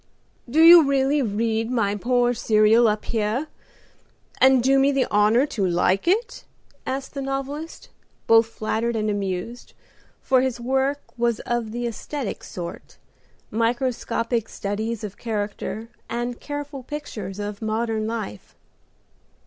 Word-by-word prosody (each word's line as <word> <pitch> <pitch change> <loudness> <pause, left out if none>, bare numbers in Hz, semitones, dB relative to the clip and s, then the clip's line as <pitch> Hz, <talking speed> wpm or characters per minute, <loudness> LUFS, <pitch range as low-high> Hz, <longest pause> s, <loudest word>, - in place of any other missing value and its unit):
"Do 310 +6 +4
you 340 +1 +10
really 275 +1 +2
read 225 0 -1
my 225 -5 +1
poor 245 +3 +1
serial 220 +1 +4
up 210 0 -1
here, 225 +5 -1 0.9
and 260 -2 +5
do 270 +1 +4
me 275 +1 +4
the 270 -2 +1
honor 210 +5 +4
to 230 -9 -3
like 185 - +1
it?" 455 +7 0 0.4
asked 270 +1 -4
the 280 - -4
novelist, 275 +4 -5 0.4
both 225 0 +5
flattered 225 +1 -2
and 215 -1 0
amused, 200 +4 -4 0.5
for 260 -1 +2
his 260 -2 -1
work 265 +3 0 0.2
was 235 -1 +1
of 240 -2 -2
the 240 +1 -3
aesthetic 240 +1 -5
sort, 175 -2 -8 0.5
microscopic 230 0 -1
studies 215 +3 -3
of 205 -1 -6
character, 215 0 -4 0.2
and 240 +1 -3
careful 290 -1 -6
pictures 230 -9 -6
of 205 0 -5
modern 220 0 -1
life. 220 - -6
235 Hz, 130 wpm, -23 LUFS, 215-265 Hz, 0.9 s, you